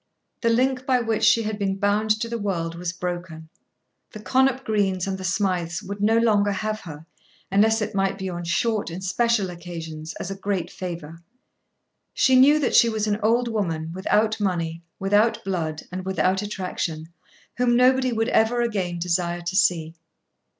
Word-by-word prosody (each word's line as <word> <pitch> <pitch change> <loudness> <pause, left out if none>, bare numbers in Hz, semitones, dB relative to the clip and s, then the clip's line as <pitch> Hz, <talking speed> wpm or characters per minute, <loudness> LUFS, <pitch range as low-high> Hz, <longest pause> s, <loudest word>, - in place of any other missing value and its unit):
The 230 - +2
link 255 +2 +1
by 255 -2 +3
which 225 -2 -1
she 230 - +5
had 215 0 -3
been 195 -1 0
bound 205 +2 +1
to 230 - -1
the 235 0 -4
world 170 -5 -2
was 170 0 -4
broken. 175 -3 -6 0.6
The 215 - -8
Connop 265 +3 +2
Greens 195 -5 0
and 195 -1 -2
the 190 - -7
Smijths 185 -2 -1
would 200 +1 -6
no 220 +2 +3
longer 210 -3 +3
have 215 +2 -2
her, 155 -5 -10 0.5
unless 220 +2 +3
it 215 +1 -5
might 195 -1 0
be 190 - -4
on 175 -1 -5
short 205 +5 0
and 175 +3 -7
special 210 0 +1
occasions, 165 -2 -7
as 190 - -5
a - - -4
great 195 -2 -3
favour. 170 -3 -7 1.0
She 260 - +4
knew 275 +4 +7
that 290 -4 0
she 235 - +6
was 215 -1 -1
an 210 0 0
old 235 +3 +2
woman, 165 -8 -2
without 215 +4 +1
money, 170 -4 -2 0.2
without 205 +4 +2
blood, 160 -5 -3
and 185 +1 -5
without 190 0 0
attraction, 180 -5 -4 0.5
whom 245 -1 +3
nobody 255 +1 +4
would 225 +1 0
ever 235 +2 +2
again 190 -7 -2
desire 175 0 -1
to 175 +2 -4
see. 170 -4 +2
195 Hz, 175 wpm, -24 LUFS, 175-225 Hz, 1.0 s, knew